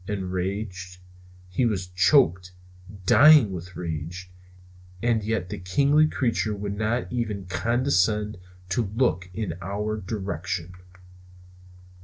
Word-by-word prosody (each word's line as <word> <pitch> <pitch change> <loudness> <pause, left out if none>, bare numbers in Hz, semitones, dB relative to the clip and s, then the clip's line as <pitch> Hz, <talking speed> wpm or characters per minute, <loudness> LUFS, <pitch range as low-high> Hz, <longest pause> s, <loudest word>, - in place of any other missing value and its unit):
Enraged? 95 -1 -4 0.5
He 90 +7 -1
was 105 -6 0
choking, 90 - +3 0.5
dying 145 -1 +7
with 90 0 -7
rage; 85 +2 -5 0.7
and 115 0 +1
yet 105 -4 -2
this - - -6
kingly 140 +11 +3
creature 115 -7 -1
would 100 0 -4
not 110 +4 -2
even 105 -5 -2
condescend 105 +1 0 0.3
to 100 +1 0
look 90 -8 +1
in 105 -2 -3
our 105 +3 -3
direction. 95 -2 -4
100 Hz, 105 wpm, -25 LUFS, 90-115 Hz, 0.7 s, dying